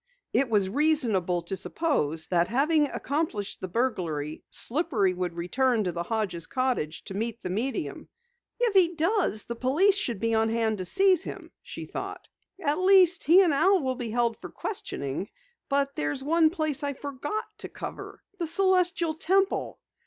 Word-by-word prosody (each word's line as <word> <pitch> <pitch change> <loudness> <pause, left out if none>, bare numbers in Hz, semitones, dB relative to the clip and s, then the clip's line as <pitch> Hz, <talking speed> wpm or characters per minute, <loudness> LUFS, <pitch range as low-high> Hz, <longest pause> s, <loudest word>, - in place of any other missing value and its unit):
It 270 -2 +2
was 205 -4 +2
reasonable 220 - +1
to 180 +3 -4
suppose 165 - 0
that, 175 -1 +2
having 295 - +2
accomplished 280 -9 -3
the 185 - -3
burglary, 170 - -2
Slippery 235 - 0
would 180 -1 -3
return 230 +7 +1
to 180 - -1
the 170 0 -4
Hodges' 185 -4 -2
cottage 255 - -1
to 195 - -7
meet 230 +3 -4
the 180 - -3
medium. 215 - -3 0.5
"If 475 -3 +2
he 355 -3 +4
does, 330 - +1
the 235 - -4
police 300 - +3
should 245 - -1
be 230 +2 0
on 225 0 +2
hand 220 -2 0
to 185 - -3
seize 385 - +3
him," - - -8
she - - -8
thought. - - -7 0.3
"At 300 -3 0
least, 370 -1 +5
he 360 +5 +7
and 335 -5 +2
Al 375 +7 +4
will 260 -1 0
be 245 -3 -5
held 235 0 0
for - - -7
questioning. 180 - -5 0.4
But 280 0 0
there's 145 - -2
one 320 +2 +4
place 310 -4 -1
I 285 -1 -1
forgot 285 +9 -4
to - - -7
cover - - -8 0.2
the 340 - -1
Celestial 355 -2 +2
Temple." 385 +5 0
260 Hz, 165 wpm, -27 LUFS, 195-330 Hz, 0.5 s, he